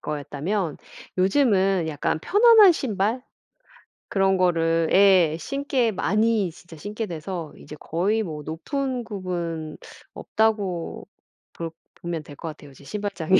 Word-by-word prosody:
거였다면 150 +4 -3 0.4
요즘은 195 - +3
약간 155 +1 -1
편안한 430 - +7
신발 225 -2 -1 0.9
그런 195 -1 +2
거를 165 -2 +2
예 185 -5 +5
신게 275 -3 0
많이 210 0 +1
진짜 165 0 -14
신게 210 +7 -4
돼서 170 -1 -5
이제 150 - -11
거의 205 +7 0
뭐 155 -4 -6
높은 255 - -3
굽은 170 -6 -4 0.4
없다고 205 -6 -1 0.5
볼 165 -1 -5 0.2
보면 170 -2 -5
될 145 - -12
것 165 - -7
같아요 150 -2 -11
이제 135 +1 -17
신발장이. 190 0 +1
185 Hz, 245 characters per minute, -24 LUFS, 165-215 Hz, 0.9 s, 편안한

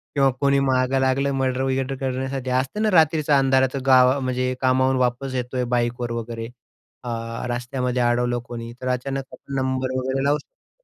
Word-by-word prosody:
किंवा 135 -1 +4
कोणी 140 0 +3
मागं 130 0 +1
लागलं 135 +1 +1
मर्डर-बिर्डर 135 0 -1
करण्यासाठी. 130 0 -3
असतं 130 +11 -1
ना 215 - +3
रात्रीचा 155 -4 +4
अंधाराचं 135 0 +2
गाव 130 0 +5
म्हणजे 130 -1 -1
कामावरून 130 0 +3
वापस 125 +2 -1
येतोय 125 0 -2
बाईकवर 120 0 -1
वगैरे 115 0 -4 0.6
अ, 125 - -5 0.4
रस्त्यामध्ये 125 +1 -2
अडवलं 120 0 +1
कोणी 115 -1 -7
तर 130 - -4
अचानक 135 +2 -2
आपण 140 - -11
नंबर 130 -1 -1
वगैरे 130 +1 -1
लावू 145 +1 +3
शकतो. - - -22
130 Hz, 155 wpm, -23 LUFS, 125-135 Hz, 0.6 s, गाव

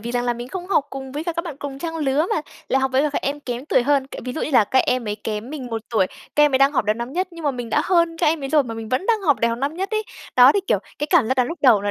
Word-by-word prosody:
vì 235 +3 -5
rằng 245 0 0
là 245 - +1
mình 240 +1 -7
không 360 +4 -6
học 370 -7 +2
cùng 265 -1 -7
với 295 +3 -4
cả 340 - -1
các 335 +1 -3
bạn 320 -6 -6
cùng 280 -1 -6
trang 325 +2 -4
lứa 295 +1 +1
mà - - 0 0.3
lại 265 - +2
học 265 0 0
với 265 +1 +3
cả 300 - +1
các 285 - -3
em 285 +1 -2
kém 245 -2 -5
tuổi 260 - +3
hơn, 275 0 +2
kiểu, - - -8
ví 250 - -4
dụ 315 - -4
như - - -2
là 245 -6 +5
các 260 - +1
em 250 -3 0
ấy 205 - -1
kém 215 +3 -4
mình 290 -4 -6
1 225 -2 -4
tuổi, 215 -5 +2 0.3
các 295 - +6
em 295 - +2
ấy - - +5
đang 275 +1 +4
học 260 - +1
đầu 210 +1 +2
năm 235 +3 -6
nhất, 365 +4 -1
nhưng 335 -2 -10
mà 290 - +3
mình 245 -3 -6
đã - - +3
hơn 340 -2 +2
các - - +1
em 305 -1 +1
ấy 270 - -3
rồi 300 0 +4
mà 230 -4 -6
mình 225 -1 -7
vẫn 255 - -1
đang 450 -2 +2
học 300 -8 +2
đại 230 - +3
học 230 0 -2
năm 280 +4 -2
nhất 385 +2 -3
ấy. 435 -1 0 0.3
Đó, 250 +2 +8
thì, 405 - +1
kiểu, - - +2 0.2
cái 295 - -1
cảm 310 -11 +4
giác 260 - +2
đó 250 - +3
lúc 330 +7 -6
đầu 235 -7 +6
nó 205 - -1
270 Hz, 370 wpm, -22 LUFS, 245-315 Hz, 0.3 s, Đó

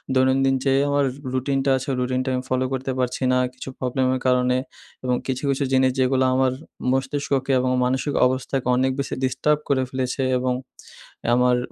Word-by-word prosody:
দৈনন্দিন 135 +1 +3
যে 135 - +3 0.2
আমার 140 -1 +2 0.3
রুটিনটা 135 +1 0
আছে 135 +3 -6
ওই 130 - -1
রুটিনটা 130 +1 -1
আমি 125 - -2
ফলো 130 0 +1
করতে 130 +1 -2
পারছি 125 +1 -1
না 125 - +3 0.2
কিছু 130 +1 -8
প্রবলেমের 130 0 0
কারণে 125 0 +3 0.5
এবং 125 -1 +1
কিছু, 130 0 -2
কিছু 135 +1 -1
জিনিস 130 0 +4
যেগুলা 130 0 +3
আমার 130 -1 +3 0.4
মস্তিষ্ককে 135 +1 -1
এবং 125 0 0
মানসিক 130 +3 0
অবস্থাকে 130 0 -1
অনেক 130 +1 +2
বেশি 140 - -2
ডিস্টার্ব 135 +3 +1
করে 130 -2 +2
ফেলেছে। 130 +1 -2 0.2
এবং 125 0 0 0.8
আমার 125 0 +3
130 Hz, 165 wpm, -23 LUFS, 125-135 Hz, 0.8 s, জিনিস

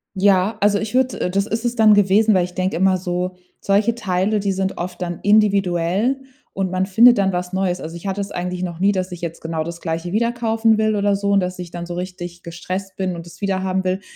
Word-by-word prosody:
Ja, 195 +2 +3
also, 205 0 +3
ich 220 +2 -4
würde 255 0 +1
äh, - - 0
das 195 +2 0
ist 225 +1 -2
es 240 0 -1
dann 215 -1 +6
gewesen, 205 +2 +4
weil 185 -2 +3
ich 180 0 -6
denke 185 +1 -1
immer 190 +1 +3
so: 180 0 -3 0.3
„Solche 210 +4 +2
Teile, 205 -1 0
die 200 0 0
sind 190 0 -2
oft 180 +1 -5
dann 175 -1 -3
individuell 200 +2 +2 0.3
und 190 -1 -1
man 185 +1 0
findet 230 +5 +6
dann 195 -1 +2
was 180 +1 -4
Neues.” 190 -1 0
Also, 165 +1 -7
ich 170 +3 -7
hatte 195 +1 -2
es 200 0 -4
eigentlich 180 0 -4
noch 175 -2 -4
nie, 195 +2 +3
dass 185 -2 -3
ich 175 - -9
jetzt 165 -1 -5
genau 160 -1 -3
das 170 +1 -7
Gleiche 165 +1 -3
wieder 235 +3 +1
kaufen 225 -1 +2
will 215 -1 +1
oder 200 0 +2
so 200 0 -1
und 200 - +4
dass 180 -1 -3
ich 175 -2 -7
dann 175 0 -6
so 175 - -6
richtig 175 -1 -6
gestresst 185 +3 -6
bin 185 -2 -2
und 170 - -8
es 175 - -14
wiederhaben 190 -1 -1
will. 185 +1 -1
190 Hz, 245 wpm, -20 LUFS, 180-205 Hz, 0.3 s, dann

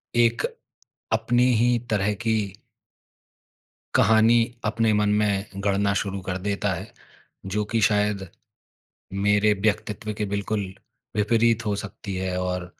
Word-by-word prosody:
एक 120 -1 +3 0.7
अपनी 120 +2 +2 0.2
ही 120 0 +3
तरह 105 -1 +2
की 110 -4 0 1.4
कहानी 110 +1 +5 0.3
अपने 110 +1 +2
मन 105 0 +2
में 100 -2 +1 0.2
गढ़ना 100 0 +2
शुरू 100 -1 -2
कर 90 0 -1
देता 100 -1 0
है, - - -6 0.6
जो 100 +2 -1
कि 115 -1 +1
शायद 105 -2 0 1.0
मेरे 105 +1 +4
व्यक्तित्व 105 0 -1
के 105 - -1
बिल्कुल 100 +1 -1 0.5
विपरीत 115 +2 +2
हो 105 -1 0
सकती 100 -1 -6
है 95 0 -2
और 90 -1 -2
105 Hz, 120 wpm, -24 LUFS, 100-110 Hz, 1.4 s, कहानी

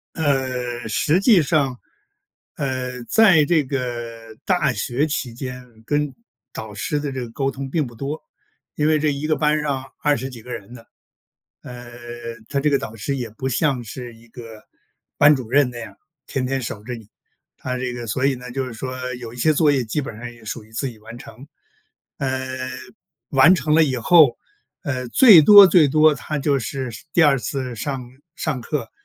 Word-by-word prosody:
呃， 130 -5 -1
实 150 - +1
际 200 -5 +5
上， 140 -4 0 0.8
呃， 130 -3 -3
在 190 - +5
这 155 0 +2
个 120 -4 -5
大 165 -8 +2
学 135 +4 -1
期 140 -5 -3
间 125 +1 -7 0.2
跟 145 +1 -1 0.4
导 110 -1 -8
师 145 +8 -2
的 145 -1 -4
这 130 - -4
个 120 - -6
沟 135 +3 -1
通 135 0 -7
并 155 -4 0
不 120 - -11
多， 140 +6 -5 0.5
因 150 0 +1
为 155 -1 +3
这 150 0 +1
一 140 +2 -4
个 155 -1 +1
班 150 0 +1
上 140 -3 -2 0.2
20 140 -3 +1
几 120 -3 -11
个 125 +2 -9
人 110 -1 -8
的。 115 -2 -13 0.8
呃， 120 -1 -10 0.6
他 140 - 0
这 150 - +1
个 140 - +3
导 110 - -7
师 115 +6 -3
也 120 -3 -5
不 130 +5 -4
像 130 0 0
是 120 +1 -8
一 115 +1 -19
个 115 -2 -11 0.5
班 145 +1 +6
主 125 -5 -5
任 140 0 +3
那 120 - -9
样， 115 - -9 0.3
天 130 -2 -2
天 135 +1 -1
守 110 -4 -6
着 125 - -5
你， 115 -3 -11 0.5
他 125 0 -4
这 125 -1 -3
个 120 -1 -6
所 130 +5 0
以 140 - +2
呢， 125 0 -9
就 130 +1 -3
是 125 - -8
说 130 +2 -5
有 120 -2 -8
一 - - -12
些 155 - +3
作 150 -1 +3
业 135 -2 +1
基 120 +6 -2
本 130 - -7
上 120 +1 -7
也 120 -1 -16
属 110 +2 -5
于 110 - -20
自 120 +5 -3
己 115 - -15
完 110 +2 -11
成。 130 +3 -13 0.7
呃， 130 -1 -3 0.6
完 140 +6 +6
成 155 -4 0
了 165 - +6
以 135 -4 +1
后， 145 +1 +5 0.5
呃， 130 -6 -3
最 205 - +8
多 205 +5 +10
最 165 -4 +5
多 155 +2 +5
他 150 +1 -4
就 140 0 +1
是 130 +2 -4
是 110 - -11
第 175 - +5
2 145 -3 +5
次 130 0 -4
上 135 +3 -4 0.3
上 150 -6 -2
课 150 +5 -4
130 Hz, 205 characters per minute, -21 LUFS, 120-150 Hz, 0.8 s, 多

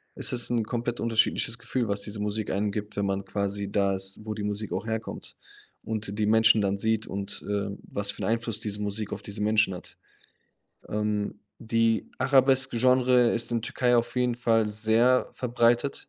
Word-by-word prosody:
Es - - -1
ist 120 0 +3
'n 115 -2 +1
komplett 120 +1 -3
unterschiedliches 115 0 +1
Gefühl, 120 -3 -2
was 100 0 -2
diese 105 0 -3
Musik 105 +1 -2
einem 100 +2 0
gibt, 105 +1 -5
wenn 100 - 0
man 100 0 -2
quasi 100 0 -3
da 100 -1 +1
ist, 95 0 -1
wo 110 - -3
die 105 -1 -5
Musik 105 0 -3
auch 95 +4 -3
herkommt 110 0 -5 0.5
und 105 -2 -3
die 105 - +2
Menschen 110 0 +5
dann 100 0 0
sieht 110 +1 0
und, 100 0 -4
äh, 100 -1 -1
was 100 0 -1
für - - -10
'n - - 0
Einfluss 115 -1 -1
diese 105 -1 -3
Musik 105 +1 -3
auf 100 - -6
diese 100 0 -6
Menschen 110 -2 +2
hat. 90 - -9 0.9
Ähm, 105 -1 -2 0.2
die 115 -1 0
Arabesk-Genre 130 -2 +4
ist 115 +1 -1
in 115 - +1
Türkei 125 +1 +1
auf 120 +2 -1
jeden 125 -1 +1
Fall 115 -2 +2
sehr 110 +4 +2
verbreitet. 120 +1 +1
110 Hz, 185 wpm, -27 LUFS, 100-120 Hz, 0.9 s, Menschen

